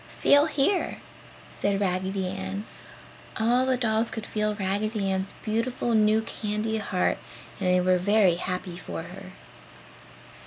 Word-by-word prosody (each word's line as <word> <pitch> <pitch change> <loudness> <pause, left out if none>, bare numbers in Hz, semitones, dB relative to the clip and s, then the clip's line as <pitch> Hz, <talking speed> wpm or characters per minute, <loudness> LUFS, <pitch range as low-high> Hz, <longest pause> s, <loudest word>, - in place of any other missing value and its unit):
Feel 285 +2 +5
here," 315 +6 +1 0.5
said 200 -1 0
Raggedy 190 0 -1
Ann. 190 +2 -4 0.7
All 245 +3 +3
the 260 -1 +2
dolls 225 -1 +1
could 220 -1 -5
feel 210 -1 -1
Raggedy 200 +1 -1
Ann's 190 +1 -2
beautiful 230 +2 -1
new 215 0 +4
candy 220 0 -2
heart 200 -3 0 0.4
and 185 -2 0
they 180 0 +4
were 180 0 +3
very 200 -1 +4
happy 180 -1 -4
for 85 - -6
her. - - -10
210 Hz, 130 wpm, -26 LUFS, 190-220 Hz, 0.7 s, Feel